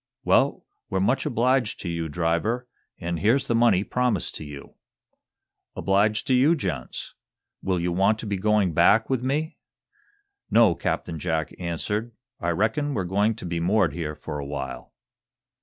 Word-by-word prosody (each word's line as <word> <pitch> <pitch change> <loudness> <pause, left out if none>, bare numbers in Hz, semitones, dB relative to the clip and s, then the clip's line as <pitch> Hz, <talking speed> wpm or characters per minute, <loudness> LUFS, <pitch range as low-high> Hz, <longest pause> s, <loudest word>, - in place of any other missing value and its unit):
"Well, - - +2 0.2
we're 95 - 0
much 130 +8 +1
obliged 125 0 +1
to - - -5
you, 85 -1 -3
driver, 85 +10 -1 0.3
and 85 -1 -3
here's 115 - +3
the - - 0
money 115 -5 +4
promised 125 -5 -1
to - - -7
you." 75 -2 -10 1.0
"Obliged 105 +2 +1
to 130 - +1
you, 135 +7 +5
gents. 90 - -5 0.5
Will 95 -2 0
you 90 +1 -1
want 95 +5 +3
to 115 - -7
be 100 -2 -2
going 105 -2 +2
back 105 - +4
with 130 -2 0
me?" 150 +5 -2 0.9
"No," 115 -6 +5
Captain 80 +1 -3
Jack 80 -3 -2
answered. 105 +7 -3 0.3
"I 85 - -1
reckon 110 - 0
we're 95 - 0
going 100 +5 +1
to 115 - -9
be 85 -1 -2
moored 90 -2 +2
here 75 -3 -4
for 75 - -6
a 70 - -5
while." 70 -3 -6
100 Hz, 160 wpm, -25 LUFS, 85-115 Hz, 1.0 s, you